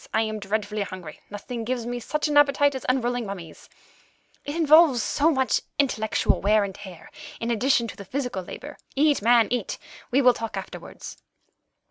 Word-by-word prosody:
I 220 - +3
am 215 -1 -3
dreadfully 210 +1 -2
hungry; 185 -5 -7
nothing 225 +3 -6
gives 240 0 -3
me 245 0 -3
such 300 +6 -2
an 295 - -1
appetite 285 0 +4
as 265 - -6
unrolling 245 -1 0
mummies; 175 -5 -9 0.7
it 285 - -5
involves 310 -5 +5
so 300 +3 +2
much 265 -4 +1 0.2
intellectual 220 -6 +1
wear 210 +2 +3
and 195 -1 -4
tear, 185 -4 -12 0.3
in 230 +1 -2
addition 235 +1 +2
to - - -8
the 200 - -9
physical 250 -2 -3
labour. 290 - -9 0.2
Eat, 290 -2 +3
man, 230 0 +5
eat. 245 -5 -2 0.3
We 270 +3 +2
will 250 0 +7
talk 225 -1 -5
afterwards." - - -8
240 Hz, 170 wpm, -25 LUFS, 210-275 Hz, 0.7 s, will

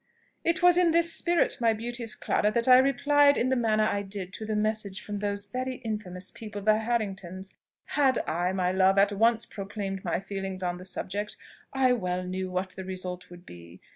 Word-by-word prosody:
It 335 +2 0
was 355 0 +6
in 355 -2 +4
this 335 0 +4
spirit, 345 -1 +2
my 230 -1 +4
beauteous 235 0 -2
Clara, 210 - 0
that 235 0 0
I 255 0 +8
replied 285 +2 +4
in 250 - +1
the 260 - +2
manner 220 -3 +2
I 205 -1 0
did 195 -1 -7
to 220 0 -7
the 215 - -1
message 210 -2 -1
from 205 -1 -6
those 200 0 -2
very 255 +5 -4
infamous 210 -6 -6
people 210 -2 -8
the 215 +1 +4
Harringtons. 195 -5 -3 0.3
Had 270 -4 +2
I, 175 +3 0
my 185 -1 0
love, 190 +1 +3
at 200 +1 +4
once 225 +3 +2
proclaimed 195 -1 -6
my 175 -1 -1
feelings 195 -1 -5
on 180 0 -2
the 185 - -10
subject, 205 +2 -4 0.3
I 265 -1 +3
well 180 -5 -2
knew 185 +1 -4
what 185 +1 -3
the 190 - -8
result 185 -1 -6
would 175 0 -13
be. 85 +1 -13
205 Hz, 200 wpm, -27 LUFS, 185-235 Hz, 0.3 s, I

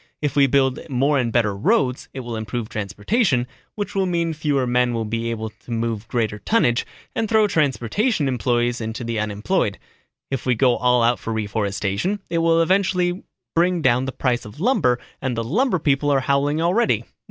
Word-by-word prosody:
If 145 -2 -2
we 140 -1 +5
build 135 -1 +2
more 140 +2 +2
and 120 -2 0
better 110 -4 +1
roads, 125 +5 +1
it 135 - -6
will 120 -2 -5
improve 110 +1 -4
transportation, 120 - 0 0.3
which 205 -1 -4
will 195 -1 +1
mean 170 -2 0
fewer 145 -4 0
men 125 0 +1
will 115 -1 -1
be 115 +2 -2
able 110 -1 -4
to - - -21
move 115 -1 -2
greater 110 -4 -1
tonnage 120 - +1 0.3
and 225 -2 -1
throw 220 -1 +4
transportation 150 - +1
employees 120 0 0
into 110 +2 -4
the 115 -1 -2
unemployed. 105 0 -1 0.5
If 135 - -2
we 125 -2 +1
go 125 +1 +3
all 125 -1 +3
out 120 +1 +2
for 115 - -5
reforestation, 105 - -1
it 170 - +1
will 165 0 +4
eventually 185 0 +1 0.3
bring 175 0 +2
down 125 0 +3
the 135 - -3
price 125 -1 -1
of 105 +7 -11
lumber 180 - +2 0.2
and 125 -3 -2
the 115 - -1
lumber 215 - +1
people 145 -2 +1
are 140 -2 +3
howling 140 +3 +1
already. 200 +8 +2
125 Hz, 185 wpm, -22 LUFS, 115-165 Hz, 0.5 s, we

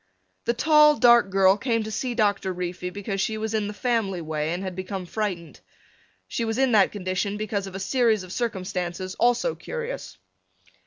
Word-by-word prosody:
The 235 - +1
tall 300 +3 +6
dark 235 -4 +6
girl 195 0 +4
came 230 -1 0
to 215 - -6
see 245 +3 -2
Doctor 205 -4 +1
Reefy 180 0 -4
because 195 +1 -4
she 220 +2 -1
was 220 0 -3
in 215 -2 0
the - - -4
family 225 -7 0
way 155 -1 -2
and 180 +3 -3
had 185 -2 -5
become 185 0 -5
frightened. 180 -4 -4 0.7
She 235 - -2
was 225 0 -2
in 265 -1 +3
that 205 -4 +4
condition 200 +1 -2
because 205 -2 -3
of 190 - -9
a - - -4
series 225 -1 +2
of 185 0 -9
circumstances 185 -5 -3
also 245 - +2
curious. 485 0 -6
205 Hz, 180 wpm, -25 LUFS, 185-235 Hz, 0.7 s, tall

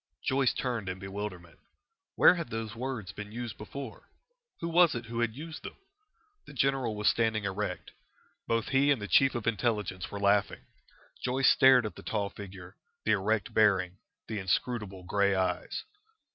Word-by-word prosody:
Joyce 130 -1 +3
turned 115 -7 -2
in 95 - -4
bewilderment. 95 -3 -7 0.6
Where - - +7
had 170 -3 -4
those 110 -1 -4
words 120 -5 -4
been 105 +2 -8
used 120 0 -5
before? 130 +2 -8 0.5
Who 170 - -3
was 170 -2 +5
it 120 0 -4
who 115 +1 -5
had 115 -2 0
used 160 +3 -8
them? - - -8 0.7
The - - -11
general 135 -5 +1
was 105 0 -1
standing 110 -2 +2
erect. 100 -1 -3 0.6
Both 115 -1 0
he 140 +1 +3
and 140 -4 +3
the 105 - -5
Chief 135 +3 +4
of 120 - -2
the 115 - +3
Intelligence 105 -4 -2
were 100 - -6
laughing. 100 0 +1 0.6
Joyce 130 +1 +4
stared 130 -3 +6
at 105 - -4
the - - -11
tall 100 -2 -2
figure, 95 -2 -10 0.3
the 110 - +3
erect 105 +1 +1
bearing, 95 -4 +3 0.3
the 110 -2 -3
inscrutable 100 0 -2
grey 100 +1 +2
eyes. 95 -1 -1
110 Hz, 170 wpm, -30 LUFS, 100-125 Hz, 0.7 s, Where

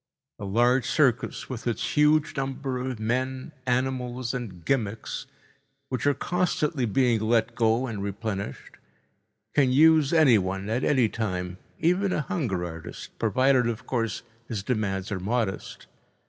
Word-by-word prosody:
A 105 - -5
large 120 +5 +3
circus 130 -6 +1
with 120 -2 -6
its 120 - -2
huge 150 +1 +4
number 135 -1 -3
of 125 -2 -4
men, 130 +4 -2 0.2
animals, 125 -1 -1
and 100 -9 -6
gimmicks, 115 -5 -2 0.6
which 130 +1 -1
are 145 - +3
constantly 155 -4 0
being 120 +1 +2
let 115 +1 +2
go 115 +2 +2
and 110 -5 -4
replenished, 100 0 -5 0.8
can 135 -3 +3
use 155 +1 +5
anyone 105 - +3
at 120 +3 0
any 130 -5 +3
time, 90 -5 -3 0.2
even 185 +4 +2
a - - 0
hunger 115 - -2
artist, 80 -2 -8
provided, 130 +3 +3
of 115 +1 -5
course, 115 -5 -2 0.2
his 105 -4 -4
demands 100 -4 -1
are 100 - -2
modest. 105 +1 -2
120 Hz, 135 wpm, -26 LUFS, 110-135 Hz, 0.8 s, use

